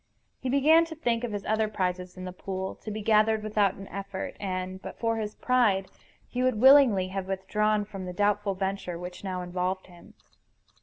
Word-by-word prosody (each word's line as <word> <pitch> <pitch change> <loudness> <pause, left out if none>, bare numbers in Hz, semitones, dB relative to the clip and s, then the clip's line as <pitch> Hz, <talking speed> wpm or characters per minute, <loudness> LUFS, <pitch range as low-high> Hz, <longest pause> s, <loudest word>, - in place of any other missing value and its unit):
He 260 - -3
began 300 +5 +5
to 325 -1 -8
think 240 -6 -1
of 240 - -2
his 205 -1 -4
other 220 0 +1
prizes 185 -3 -3
in 185 - -6
the 185 - -5
pool, 190 0 -4
to - - -9
be 215 0 -5
gathered 215 0 +3
without 210 -2 +1
an 195 0 -10
effort; 195 -1 -5
and, 185 -1 -4
but - - -8
for 230 -1 0
his 215 -1 -4
pride, 215 -7 +2 0.4
he 250 - -3
would 255 -4 +1
willingly 255 -8 +6
have 190 0 -4
withdrawn 210 +2 0
from 195 -3 -7
the - - -4
doubtful 205 +1 +1
venture 190 -2 -3
which 180 +2 -8
now 185 -2 -3
involved 180 +1 -2
him. 175 -2 -17
200 Hz, 195 wpm, -28 LUFS, 185-220 Hz, 0.4 s, willingly